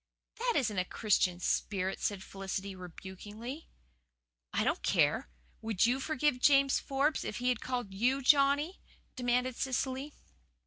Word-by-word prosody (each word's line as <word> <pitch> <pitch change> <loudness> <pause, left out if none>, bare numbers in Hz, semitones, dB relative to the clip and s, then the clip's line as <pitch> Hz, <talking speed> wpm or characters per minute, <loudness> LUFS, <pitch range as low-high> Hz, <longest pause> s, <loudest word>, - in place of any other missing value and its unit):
"That 485 0 +1
isn't 215 -8 +1
a - - +2
Christian 185 -3 +1
spirit," 190 +1 -1
said 200 -2 -1
Felicity 195 0 -5
rebukingly. 205 - -9 0.8
"I - - +1
don't - - 0
care. - - +2 0.3
Would 220 -2 +2
YOU 250 +3 +2
forgive 295 -2 0
James 275 0 +5
Forbes 280 +3 0
if 210 - -4
he 250 +1 0
had 245 -3 0
called 245 -6 -3
YOU 255 +7 +1
Johnny?" 285 +5 +4 0.3
demanded 250 0 0
Cecily. 265 +2 -2
250 Hz, 135 wpm, -32 LUFS, 200-275 Hz, 0.8 s, James